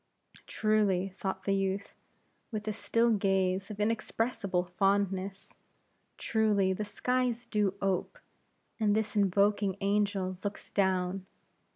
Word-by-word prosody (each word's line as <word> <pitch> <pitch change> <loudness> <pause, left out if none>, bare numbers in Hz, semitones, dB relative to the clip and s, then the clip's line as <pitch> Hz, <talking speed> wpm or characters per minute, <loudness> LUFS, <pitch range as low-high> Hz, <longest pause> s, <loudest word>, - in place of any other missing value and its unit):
Truly, 205 -3 +1
thought 190 0 -4
the 195 - +1
youth, 195 0 -1 0.6
with 215 -2 -5
a 215 - 0
still 230 +2 +2
gaze 195 -2 +1
of 210 -1 -7
inexpressible 220 -3 0
fondness; 195 +1 -1 0.6
truly 210 -4 +2
the 210 - -3
skies 250 +2 -1
do 210 -4 0
ope, 195 - -1 0.6
and 210 -2 +3
this 220 0 -1
invoking 200 0 +2
angel 200 -2 0
looks 205 0 -5
down. 190 -1 0
200 Hz, 110 wpm, -30 LUFS, 190-215 Hz, 0.6 s, and